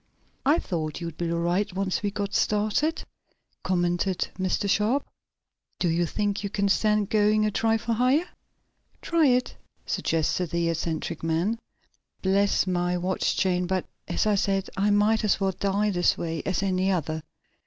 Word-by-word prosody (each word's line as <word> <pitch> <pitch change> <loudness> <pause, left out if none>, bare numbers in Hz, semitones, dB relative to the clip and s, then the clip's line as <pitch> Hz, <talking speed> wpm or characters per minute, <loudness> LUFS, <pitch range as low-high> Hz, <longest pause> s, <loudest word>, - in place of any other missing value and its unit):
"I 300 +4 +5
thought 155 - -3
you'd 165 -2 -6
be 170 -1 -1
all 170 - 0
right 175 +5 0
once 190 -1 -1
we 205 - 0
got 200 0 -4
started," 215 +10 +1 0.6
commented 175 +1 0
Mr. 185 +2 0
Sharp. 215 +8 +1 0.7
"Do 175 - 0
you 170 +1 +1
think 205 +2 -1
you 200 - -2
can 200 0 0
stand 210 0 +2
going 215 0 +3
a 215 - +1
trifle 225 +2 +1
higher?" 255 +8 +2 0.8
"Try 330 -3 +3
it," 250 0 +1 0.3
suggested 165 +2 0
the 170 +1 0
eccentric 165 0 -3
man. 170 +8 0 0.6
"Bless 195 +1 +2
my 180 -1 0
watch 180 +1 0
chain, 180 -1 +1
but, 185 0 -1 0.2
as - - 0
I 215 - +3
said, 195 -1 0
I 200 +2 +1
might 210 +2 +3
as 210 - +2
well 195 -1 +1
die 200 +2 0
this 175 -2 +2
way 165 -2 -3
as 190 0 0
any 190 0 +1
other. 160 -4 -1
195 Hz, 160 wpm, -26 LUFS, 175-210 Hz, 0.8 s, I